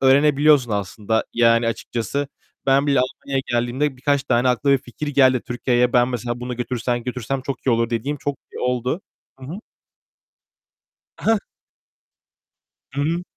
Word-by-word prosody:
öğrenebiliyorsun 140 -1 +5
aslında 105 +2 -1
yani 115 0 +4
açıkçası. 120 +5 -3 0.4
Ben 135 +2 +4
bile 140 -2 +3
Almanya'ya 135 +1 -2
geldiğimde 125 +4 0
birkaç 140 +1 +1
tane 130 -2 +2
aklıma 135 +3 +3
bir - - -11
fikir 125 +5 -7
geldi 130 -3 +4
Türkiye'ye. 120 0 +1
Ben 120 0 +4
mesela, 120 0 -3
bunu 125 -1 -4
götürsem 120 -1 -2
götürsem 125 +1 -3
çok 135 -1 -5
iyi - - +4
olur 115 0 +1
dediğim 130 +6 -1
çok 145 0 -3 0.2
oldu. 125 +6 -1 0.4
Hı - - -9
hı. 160 - -6 1.6
Heh. 225 -1 +2 1.5
Hı 140 - -1
hı. 170 +4 0
125 Hz, 140 wpm, -22 LUFS, 120-140 Hz, 1.6 s, öğrenebiliyorsun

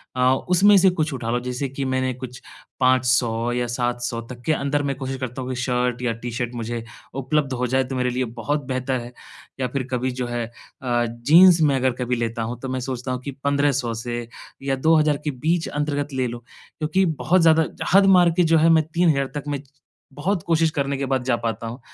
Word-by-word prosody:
अ, 125 0 +4 0.2
उसमें 200 +3 +6
से 190 0 +6
कुछ 160 -4 -1
उठा 115 -3 -4
लो। 120 - +1
जैसे 125 +2 -3
कि 135 +1 -5
मैंने 130 0 0
कुछ 125 0 -9 0.4
500 125 -2 +2
या 120 0 -1
700 120 0 -2
तक 120 -1 -9
के 160 - +2
अंदर 145 0 0
मैं 140 -1 -1
कोशिश 135 0 -4
करता 130 0 -5
हूँ 130 - -5
कि 130 - -2
शर्ट 125 -1 0
या 125 -2 0
टी 120 0 -4
शर्ट 120 0 -3
मुझे 115 0 -4 0.3
उपलब्ध 135 +1 0
हो 125 0 -1
जाएँ, 130 +2 +2
तो 130 - -4
मेरे 125 0 0
लिए 125 +1 -1 0.2
बहुत 145 +3 -1
बेहतर 130 0 -1
है। 120 +1 -9 0.5
या 130 - 0
फिर 140 - -1
कभी 125 0 -1
जो 125 - -1
है 120 -1 -2
अ, 120 +1 -3
जीन्स 160 +10 +5
मैं 145 -3 +4
अगर 130 0 +2
कभी 125 0 0
लेता 115 0 -2
हूँ, 120 +2 -5
तो 130 - -6
मैं 130 0 -2
सोचता 130 0 -4
हूँ 125 - -2
कि 140 +2 -5
1500 140 -4 +1
से 120 +1 -4 0.4
या 135 0 0
2000 155 +1 +3
के 150 - -1
बीच 160 +6 -1
अंतर्गत 145 -1 -2
ले 130 -1 0
लो, 120 0 -6 0.4
क्योंकि 170 +5 +1 0.2
बहुत 185 +2 +4
ज़्यादा 160 -1 +5 0.3
हद 195 0 +7
मार 175 -1 +5
के 180 - +5
जो 165 - +6
है, 160 +1 +4
मैं 160 -1 +5
3000 160 -6 +2
तक 145 - -3
मैं 145 -1 -2
च 140 - -27 0.4
बहुत 175 +7 -1
कोशिश 165 -1 +2
करने 140 -3 -1
के 135 - -2
बाद 130 -2 +1
जा 125 -2 +1
पाता 115 0 -2
हूँ। 120 +4 -7
130 Hz, 225 wpm, -22 LUFS, 125-145 Hz, 0.5 s, हद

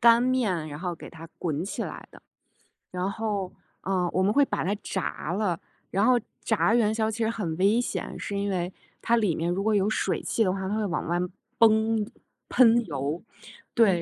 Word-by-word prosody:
干 235 0 +7
面 220 -11 +1
然 145 0 -7
后 180 0 -3
给 - - -10
它 165 -1 -10
滚 160 0 -1
起 195 - -3
来 - - -7
的。 - - -15 0.7
然 185 +2 -1
后， 205 -3 -2 0.3
呃， 185 -2 0
我 185 - +2
们 200 - +3
会 285 +2 +5
把 - - -2
它 195 +5 0
炸 180 -3 -3
了。 190 -3 0 0.3
然 195 +3 +2
后 250 0 +5 0.2
炸 220 0 +2
元 220 -3 +3
宵 220 0 +1
其 220 - -4
实 220 - +2
很 205 -8 -2
危 200 +5 +4
险， 245 - -3
是 200 - -3
因 200 0 -1
为 180 -2 -1 0.3
它 235 - +3
里 210 -7 +2
面 170 +2 -1
如 195 - -1
果 220 0 +2
有 200 0 +3
水 - - 0
汽 225 - +1
的 185 - +2
话， 190 -1 -3
它 205 - -1
会 215 -1 0
往 175 -3 -2
外 175 +1 +1 0.4
崩 220 -1 +4 0.4
喷 235 -2 +5
油。 145 +1 -3 0.5
对， 195 -7 +4
200 Hz, 220 characters per minute, -27 LUFS, 180-225 Hz, 0.7 s, 干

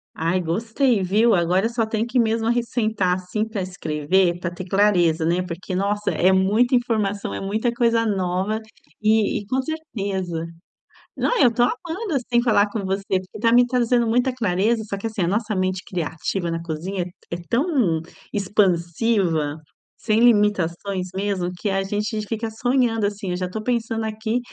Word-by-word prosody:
Ai, 170 +3 0
gostei, 225 - +1
viu, 215 +6 +3
agora 180 +4 +2
só 230 -1 -1
tenho 220 0 -1
que 250 +2 0
mesmo 225 -1 +1
arris 235 0 +1
sentar, 215 -6 +1
assim, 185 +4 -3
pra 215 -4 -4
escrever, 175 0 0
pra 170 - -2
ter 175 +1 -7
clareza, 180 -4 +3
né, 175 +3 +1
porque, 180 +1 -6
nossa, 205 +2 0
é 185 +2 +3
muita 210 +7 +3
informação, 215 -5 0
é - - -4
muita 220 +5 -1
coisa 230 -1 +2
nova, 190 +1 0 0.4
e 215 -1 +2
e 205 - -11
com 260 +5 0
certeza 195 - -4 0.7
não, - - 0
eu 240 -2 +5
tô 240 - 0
amando, 330 - -2
assim, 240 -2 +1
falar 220 -4 +3
com 210 -2 -3
você, 195 +1 -1 0.2
porque 185 +3 -11
tá 230 +1 +3
me 245 0 +6
trazendo 245 -1 +2
muita 245 +3 +2
clareza. 220 0 +1
Só 200 -2 -4
que, 200 - -7
assim, 220 -3 -4
a 170 - +2
nossa 215 +3 0
mente 185 -1 -1
criativa 170 +1 -3
na 165 0 -3
cozinha, 175 +4 -4
é - - -7
t 180 - -10 0.2
é 170 - -2
tão 245 - +2 0.3
expansiva, 180 -4 +1 0.4
sem 220 0 +1
limitações, 200 -4 +2
mesmo, 190 -2 -1
que 210 - -1
a 195 0 0
gente 210 +2 -2
fica 225 +1 -3
sonhando, 235 -1 +1
assim, 200 -2 -3
eu - - -1
já 180 0 -3
tô 215 +4 -5
pensando 225 -1 -1
aqui, 220 +2 -2
205 Hz, 175 wpm, -22 LUFS, 185-230 Hz, 0.7 s, me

